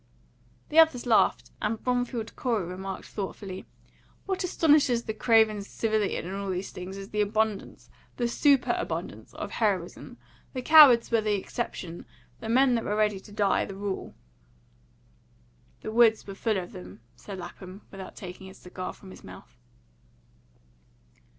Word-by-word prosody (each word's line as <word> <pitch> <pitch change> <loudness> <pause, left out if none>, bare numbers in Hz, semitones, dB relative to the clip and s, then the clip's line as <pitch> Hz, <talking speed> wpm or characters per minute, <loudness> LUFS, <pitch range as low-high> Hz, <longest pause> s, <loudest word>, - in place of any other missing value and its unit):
The 310 - +4
others 315 -7 +5
laughed, 230 -3 +2
and 215 +1 -1
Bromfield 245 -2 -2
Corey 230 -8 -1
remarked 190 +2 -6
thoughtfully, 195 -1 -6 0.6
"What 380 -1 -2
astonishes 295 -8 +3
the 220 - -4
craven 220 -2 +3
civilian 215 -2 -1
in 185 - -5
all 200 0 -4
these 185 +1 -3
things 185 +2 -7
is 195 +1 -8
the 210 - 0
abundance 215 0 -2 0.3
the 240 - 0
superabundance 275 +2 0
of - - -6
heroism. 195 -6 -2 0.4
The 255 -2 -4
cowards 285 -8 +8
were 230 -1 +3
the 210 -1 +1
exception; 175 -3 -5 0.3
the 225 - -6
men 255 +2 +4
that 230 -1 0
were 210 - -1
ready 210 -2 +1
to 205 - -16
die, 205 -1 +2
the 195 - -8
rule." 200 -1 -5 1.7
"The - - -5
woods 225 -1 +4
were 195 - -7
full 215 +1 -1
of 180 -2 -5
them," 90 +4 -11
said 200 -2 -9
Lapham, 185 +2 -9
without 190 -1 -9
taking 185 0 -9
his 190 - -13
cigar 185 0 -7
from 190 - -14
his - - -13
mouth. - - -13
210 Hz, 150 wpm, -27 LUFS, 190-235 Hz, 1.7 s, cowards